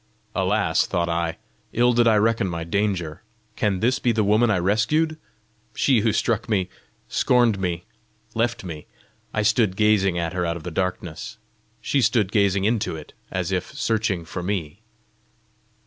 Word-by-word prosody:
"Alas," - - +1
thought 85 0 -1
I, 85 0 -1 0.4
"ill 120 +1 +3
did 120 0 +4
I 110 - +5
reckon 110 -1 +2
my 85 -2 -3
danger! 90 -3 -1 0.3
Can 100 -4 0
this 125 +4 +2
be 120 - +2
the 110 -1 +1
woman 105 +4 +3
I 105 - +3
rescued 110 - +1 0.6
she 130 -4 +3
who 110 +1 +2
struck 115 +2 0
me, 95 -4 +1 0.4
scorned 120 -5 +2
me, 90 -2 -2 0.5
left 115 0 -1
me?" 80 -5 -7 0.4
I 110 - 0
stood 105 -3 +2
gazing 100 -4 +3
at 85 0 -2
her 90 -1 -1
out 85 0 -1
of 80 - -11
the 90 - -5
darkness; 90 -2 -3 0.4
she 140 - +1
stood 115 -4 +2
gazing 100 -3 +2
into 110 -5 0
it, 75 -2 -10 0.2
as - - -2
if - - -2
searching 105 -6 0
for 90 - -5
me. 90 -1 -3
100 Hz, 165 wpm, -23 LUFS, 90-115 Hz, 0.6 s, I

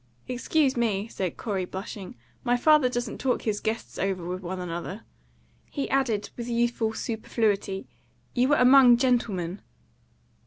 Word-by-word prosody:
"Excuse 265 +3 +1
me," 220 -4 0
said 185 -6 -4
Corey, 200 -4 -2
blushing, 190 +4 -7 0.3
"my 245 -1 +2
father 300 -1 +5
doesn't 240 -2 -3
talk 260 -2 0
his 210 -2 -1
guests 225 +1 -4
over 190 -3 -1
with 180 +1 -4
one 185 +1 -5
another." 180 +4 -5 0.7
He 280 - -3
added, 235 -7 0
with 240 0 -5
youthful 235 -1 0
superfluity, 215 -4 -1 0.5
"You 250 +1 +3
were 290 - +4
among 250 -2 +7
gentlemen." 210 -8 0
225 Hz, 140 wpm, -26 LUFS, 195-250 Hz, 0.7 s, among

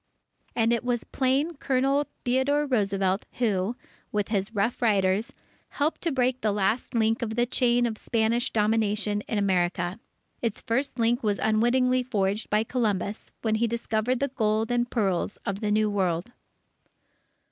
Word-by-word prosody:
And 230 0 +3
it 235 - 0
was 245 -2 -1
plain 275 +5 0
Colonel 275 +2 +1 0.2
Theodore 265 +4 +2
Roosevelt 195 -6 0
who, 215 -2 0 0.4
with 205 -1 -1
his 200 -2 -1
Rough 215 +4 0
Riders, 200 -2 +2 0.4
helped 295 +3 -1
to 335 - 0
break 255 -1 +1
the 215 - +1
last 210 +5 0
link 225 +1 +2
of 220 -2 -2
the 240 +1 +2
chain 245 -1 +2
of 220 -2 -3
Spanish 230 +1 +1
domination 210 -1 +1
in 220 - -1
America. 180 -1 0 0.4
Its 230 -3 -2
first 260 +3 -1
link 235 +1 +2
was 205 -2 0
unwittingly 250 +4 +2
forged 210 -4 -1
by 210 +1 +2
Columbus, 215 -4 -2
when 220 -2 +1
he 235 - +3
discovered 230 +1 -1
the 280 +1 0
gold 220 -2 0
and 240 0 +1
pearls 200 -4 0
of 200 -1 -2
the 210 - -1
New 215 +1 +3
World. 190 0 -1
225 Hz, 155 wpm, -26 LUFS, 205-245 Hz, 0.4 s, And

